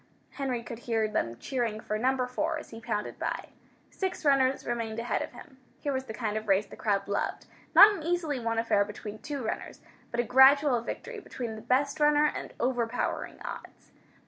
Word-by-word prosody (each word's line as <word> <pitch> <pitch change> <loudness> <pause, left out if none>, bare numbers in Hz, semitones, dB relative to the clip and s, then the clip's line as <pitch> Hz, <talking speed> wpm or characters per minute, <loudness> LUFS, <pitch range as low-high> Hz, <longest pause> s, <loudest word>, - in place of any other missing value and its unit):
Henry 255 -4 -3
could 230 0 -7
hear 225 -2 0
them 120 - -2
cheering 230 - -2
for 215 - -3
Number 255 +1 +2
4, 305 +6 -1
as - - -10
he 225 0 -9
pounded 215 -2 -3
by. - - -3 0.4
Six 375 -4 -3
runners 270 -2 +3
remained 230 -2 -2
ahead 235 +1 -1
of - - -4
him. 260 +2 -13 0.2
Here 285 - -2
was 260 0 -2
the 230 - -7
kind 215 -2 -2
of 215 0 -5
race 195 +1 +3
the - - -12
crowd 200 -2 0
loved; 200 - -2 0.3
not 420 +1 +10
an 385 - -6
easily 325 -4 -1
won 230 -1 -1
affair 225 -3 +3
between 210 +1 -8
two 290 -4 -5
runners, - - -4 0.3
but 235 - -3
a - - +4
gradual 265 +1 +6
victory 465 - -6
between 240 - -6
the 215 - -8
best 275 +6 +1
runner 295 0 +5
and 300 - -2
overpowering 245 -1 -1
odds. - - -9
245 Hz, 195 wpm, -29 LUFS, 220-280 Hz, 0.4 s, not